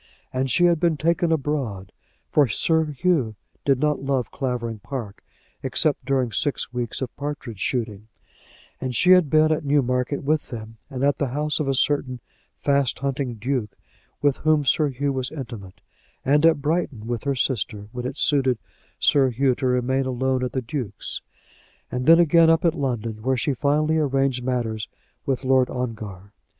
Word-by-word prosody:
And 130 +1 0
she 175 +8 +4
had 170 -2 +3
been 170 -2 +2
taken 170 +2 +1
abroad, 135 -11 -2 0.4
for 145 -3 +4
Sir 160 +8 +1
Hugh 145 -6 0 0.3
did 135 -2 +3
not 150 0 +1
love 135 -2 -1
Clavering 120 -5 -3
Park, 110 -2 -7 0.4
except 140 +1 0
during 130 -3 +1
six 130 +3 -1
weeks 120 +1 -3
of 125 - -6
partridge 140 -7 -5
shooting; 110 -3 -2 0.7
and 130 -2 -3
she 180 - +4
had 180 -5 +6
been 155 +1 +4
at 155 - 0
Newmarket 135 -1 +1
with 155 +2 0
them, 110 -1 -8
and 135 -2 -4
at 140 0 +2
the 140 - +1
house 150 +4 0
of 150 - -1
a 135 - +1
certain 130 -2 0 0.4
fast 140 -3 +1
hunting 135 -3 -2
duke 115 -1 -2 0.5
with 145 -2 +3
whom 155 -2 +2
Sir 150 +3 +3
Hugh 140 +2 -1
was 130 -1 -2
intimate; 105 -9 -8 0.4
and 150 +4 +5
at 155 -4 +2
Brighton 150 -8 -1
with 120 +1 -3
her 140 -1 +1
sister, 105 -5 -2
when 125 0 -4
it 135 +2 -6
suited 135 -4 +2 0.4
Sir 135 -2 +4
Hugh 130 +2 +2
to 130 +1 -2
remain 130 +1 +1
alone 130 0 0
at 125 - -3
the 130 - -2
duke's; 120 -3 -5 0.7
and 125 +1 -3
then 165 +1 +8
again 165 -1 +5
up 165 +1 +3
in 165 - +4
London, 120 -7 -3
where 130 +3 +1
she 135 +4 0
finally 150 +4 +1
arranged 135 -3 +1
matters 115 -4 -2 0.4
with 135 -1 0
Lord 130 -1 +3
Ongar. 105 -6 -5
135 Hz, 170 wpm, -23 LUFS, 120-150 Hz, 0.7 s, then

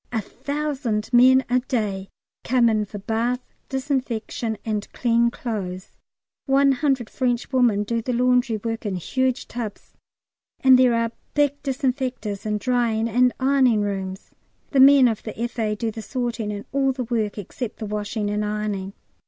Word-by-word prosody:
A 230 - 0
thousand 270 -2 -3
men 260 +2 +6
a 250 +1 +2
day 210 -7 -2 0.3
come 245 -1 +3
in 215 -1 +1
for 205 - -8
bath, 230 +5 -2 0.2
disinfection, 255 -5 -2
and 215 -2 -3
clean 235 -1 +2
clothes; 195 -7 -5 0.6
100 270 -2 +2
French 245 0 -1
women 235 -5 +3
do 230 +2 -1
the 250 - -3
laundry 250 -1 +2
work 225 +1 -4
in 205 -3 -2
huge 260 +8 -1
tubs, 230 -4 -7 0.7
and 260 -2 +6
there 250 -2 +5
are 230 0 0 0.2
big 285 -1 +2
disinfectors 255 -7 -2
and 210 0 0
drying 235 -2 +1
and 250 +2 +3
ironing 260 -5 +3
rooms. 190 -2 -4 0.4
The 275 - +2
men 270 -1 +8
of 225 -3 -1
the 215 - -8
F.A. 230 -2 -1
do 225 +1 -2
the 225 - -7
sorting 235 -3 -3
and 205 0 -6
all 270 -1 +2
the 260 -1 -3
work 220 -3 -2
except 210 +3 -6
the 220 - -5
washing 210 0 -3
and 210 0 -1
ironing. 210 -2 -3
235 Hz, 155 wpm, -23 LUFS, 210-255 Hz, 0.7 s, men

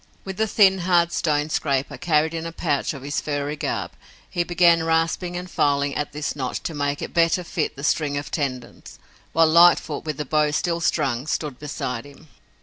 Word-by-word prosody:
With 190 +2 -5
a 220 - +2
thin, 190 -2 +4
hard 175 -1 +2
stone 150 -2 0
scraper, 140 -3 -1
carried 160 -1 +1
in 165 0 -4
a - - -6
pouch 150 -3 -1
of 135 - -9
his 145 +1 -2
furry 145 0 -3
garb, 150 - -3 0.4
he 175 - -1
began 170 -1 +4
rasping 165 +2 0
and 180 +1 -6
filing 140 -4 +1
at 150 +1 -3
this 150 0 -4
notch 130 -3 -4
to 165 - -4
make 145 -1 -2
it - - -6
better 170 +2 +2
fit 165 -2 -3
the 140 - -9
string 145 -1 0
of 145 - -5
tendons, 130 -5 -5 0.3
while 165 +1 +4
Lightfoot, 165 -2 +4
with 155 -3 -4
the 150 - -3
bow 150 +1 +2
still 170 +3 -1
strung, 135 -4 0
stood 150 -4 -3
beside 125 -5 -4
him. 145 +2 -16
155 Hz, 195 wpm, -23 LUFS, 145-170 Hz, 0.4 s, thin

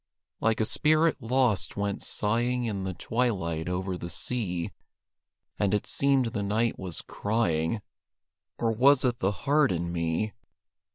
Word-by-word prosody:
Like 115 -1 +1
a 110 - +2
spirit 155 +4 +3
lost 115 -6 +1
went 100 0 -1
sighing 120 +3 0
In 100 -4 -2
the 95 -1 -3
twilight 95 -9 -1
over 90 0 -2
the 85 - -5
sea; 90 -7 -2 0.9
And 100 0 +2
it 105 - -1
seemed 135 -4 +2
the 105 - -1
night 110 +3 0
was 90 -3 -4
crying 105 -3 0 0.7
Or 115 -1 +1
was 130 +4 +5
it 120 -2 +1
the 95 - +1
heart 145 -2 +4
in 85 -1 -2
me? 85 +5 -1
105 Hz, 145 wpm, -28 LUFS, 95-125 Hz, 0.9 s, was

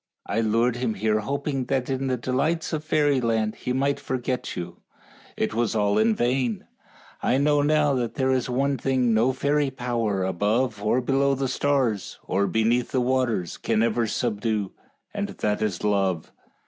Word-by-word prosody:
I 105 +4 0
lured 115 +2 +1
him 120 -3 -1
here 110 +1 +1
hoping 140 +3 -2
that 130 -1 -1
in 135 0 -2
the 130 -1 0
delights 145 +8 -1
of 155 -1 -2
fairyland 125 -8 +1
he - - -5
might 140 +2 +1
forget 130 0 -3
you. 85 0 -6 0.6
It 110 - -1
was 115 -1 0
all 105 -1 +2
in 220 0 +3
vain. 120 - 0 0.6
I 130 - +2
know 145 +1 +3
now 150 -1 +3
that 120 -3 -2
there 130 -1 +1
is 130 -1 0
one 135 +2 0
thing 130 -3 +1
no 115 +4 +3
fairy 140 +2 +1
power 120 -6 -1
above 105 +5 0
or 110 +5 +2
below 135 +2 +2
the 135 0 -1
stars, 130 -8 0
or 100 +2 0
beneath 115 +2 +1
the 130 - 0
waters, 125 -7 0
can 115 -1 +1
ever 115 0 +1
subdue, 105 -3 -1 0.4
and 205 -1 -2
that 105 0 -2
is 105 -5 -2
love. 95 -5 0
125 Hz, 170 wpm, -25 LUFS, 110-135 Hz, 0.6 s, in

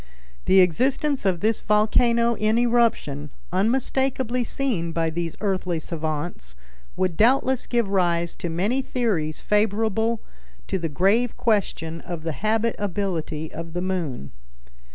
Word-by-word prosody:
The 190 0 +6
existence 260 - +1
of 175 -3 0
this 220 +1 +1
volcano 235 +2 +3
in 215 0 +1
eruption, 230 -12 +1 0.2
unmistakably 250 +4 +1
seen 215 -10 -2
by 165 0 0
these 170 0 -3
earthly 185 -4 -1
savants, 155 - -4 0.4
would 185 -3 0
doubtless 255 +5 +3
give 235 -3 +1
rise 170 -3 +1
to 175 - -4
many 200 +11 0
theories 200 - -1
favorable 220 +2 +1 0.5
to 190 - 0
the 165 -1 -2
grave 200 - +2
question 165 -7 0
of 170 -3 -6
the 165 - -2
habitability 200 - -2
of 165 0 -7
the 175 - -2
moon. 165 - -3
195 Hz, 125 wpm, -24 LUFS, 165-230 Hz, 0.5 s, The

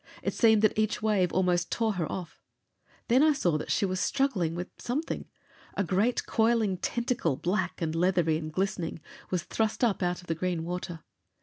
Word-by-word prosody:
It - - -1
seemed 220 -2 +4
that 215 - +4
each 215 0 0
wave 200 -5 +2
almost 180 -1 +1
tore 225 -2 +1
her 175 -5 -2
off. 180 -4 -6 0.7
Then 250 +3 +5
I 310 0 +5
saw 180 - +1
that - - -6
she - - +2
was 185 -1 -1
struggling 215 - +1
with 180 +1 -4
something. 285 +7 -3 0.5
A 200 - +1
great 200 +7 +1
coiling 220 -4 +2
tentacle, 235 - -1
black 185 +1 -1
and 160 -1 -1
leathery 170 -2 +2
and 155 -1 -5
glistening, 185 -1 -2 0.3
was 180 -3 -1
thrust 220 +5 -1
up 220 -5 +2
out 180 -1 0
of - - -16
the 165 - -1
green 170 0 -2
water. 175 -1 -5
185 Hz, 185 wpm, -29 LUFS, 175-220 Hz, 0.7 s, Then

